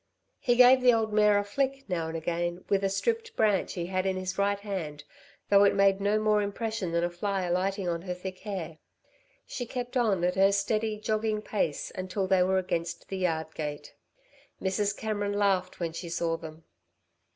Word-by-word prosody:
He 245 -3 +2
gave 250 +1 +7
the 250 -2 +6
old 220 -1 -1
mare 210 -1 +5
a 205 - +1
flick, 270 +6 -2
now 170 -4 -2
and 165 0 -4
again, 175 +2 -3
with 200 0 +2
a 195 - +2
stripped 455 - -1
branch 210 -3 +2
he 175 -2 -3
had 185 +1 -1
in 190 - 0
his 185 0 -3
right 200 +1 +1
hand, 170 -8 -5 0.5
though 200 0 +6
it 200 - +4
made 195 0 +3
no 205 +2 +2
more 215 -1 +2
impression 205 -2 -3
than 170 0 +1
a 175 - +1
fly 195 +2 -2
alighting 185 +2 -1
on 170 -1 -1
her 180 0 -4
thick 185 +1 -7
hair. 180 -6 -6 0.7
She 245 -2 -5
kept 245 +1 -5
on 215 -8 +2
at 180 0 +2
her 195 +1 +4
steady, 215 +2 0
jogging 215 0 -1
pace 180 -10 -2
until 185 +1 -2
they 185 -1 +3
were 190 +1 +3
against 170 -2 -3
the 195 - -3
yard 160 -3 -1
gate. 150 -2 -5 0.7
Mrs. 200 +2 -1
Cameron 205 -2 -2
laughed 195 -3 +1
when 165 -2 -2
she 170 +1 -6
saw 165 0 -1
them. 160 0 -10
195 Hz, 195 wpm, -28 LUFS, 175-210 Hz, 0.7 s, gave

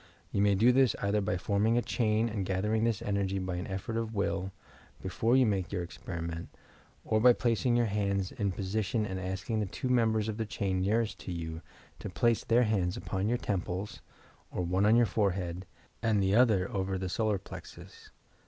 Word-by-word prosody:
You 100 - +1
may 100 -1 +4
do 115 +6 +5
this 130 -3 +4
either 100 +1 +1
by 100 -2 -1
forming 105 +5 +1
a - - +3
chain 110 -1 +1
and 105 -3 -2
gathering 105 +4 0
this 115 -1 0
energy 100 -3 -1
by 95 -1 -3
an 90 - -4
effort 100 +4 -4
of 115 -1 -3
will, 95 -1 -1 0.5
before 115 +7 +1
you 130 - +5
make 95 -5 -1
your 90 -3 -2
experiment, 85 -1 -6 0.6
or 110 0 +1
by 125 +1 +8
placing 120 +1 +1
your 120 0 +3
hands 100 -2 -1
in 100 -2 -1
position 105 +4 -1
and 95 -2 -4
asking 95 +4 -3
the 105 - -1
two 125 - -4
members 110 -3 +2
of 110 -1 -3
the 110 - -2
chain 95 -3 -1
near 105 +5 +2
est 110 - -7
to - - -5
you 80 -1 -5 0.4
to - - -6
place 115 -1 +1
their 120 +2 +3
hands 95 -5 0
upon 95 +2 -2
your 120 - +2
temples, 95 -1 -3 0.5
or 90 - -3
one 95 +4 +2
on 110 - +6
your 120 0 +5
forehead, 95 -3 -1 0.3
and 110 -3 +2
the 95 +1 +2
other 110 -5 +4
over 95 -1 -1
the 95 0 -3
solar 105 +2 0
plexus. 95 - -11
100 Hz, 200 wpm, -30 LUFS, 95-110 Hz, 0.6 s, by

